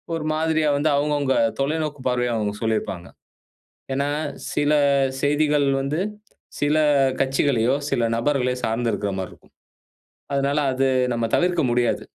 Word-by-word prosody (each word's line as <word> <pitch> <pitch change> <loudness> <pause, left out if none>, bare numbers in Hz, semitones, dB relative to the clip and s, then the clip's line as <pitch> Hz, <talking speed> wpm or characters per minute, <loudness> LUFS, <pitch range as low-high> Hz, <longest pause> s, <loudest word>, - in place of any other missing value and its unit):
ஒரு 160 -2 -4
மாதிரியா 160 -1 +1
வந்து 150 +2 +1
அவுங்க, 150 +1 +1
அவுங்க 140 -2 +1 0.2
தொலைநோக்கு 150 +1 -1
பார்வையா 125 -1 0
அவங்க 105 -2 -1
சொல்லியிருப்பாங்க. 110 -5 -2 0.9
ஏன்னா 140 +2 0 0.4
சில 145 0 +1 0.5
செய்திகள் 145 0 +2 0.2
வந்து, 140 +4 -2 0.6
சில 145 +1 +2 0.4
கட்சிகளையோ 135 -2 +1
சில - - 0 0.2
நபர்களையோ 125 0 0
சார்ந்து 115 +1 -1
இருக்கிற 100 -1 -2
மாரி 95 - -5
இருக்கும். - - -20 0.8
அதனால 140 +1 0 0.2
அது 135 +1 +1 0.3
நம்ம 115 -1 -1
தவிர்க்க 175 -2 +1
முடியாது. 120 0 +1
140 Hz, 130 wpm, -22 LUFS, 120-150 Hz, 0.9 s, செய்திகள்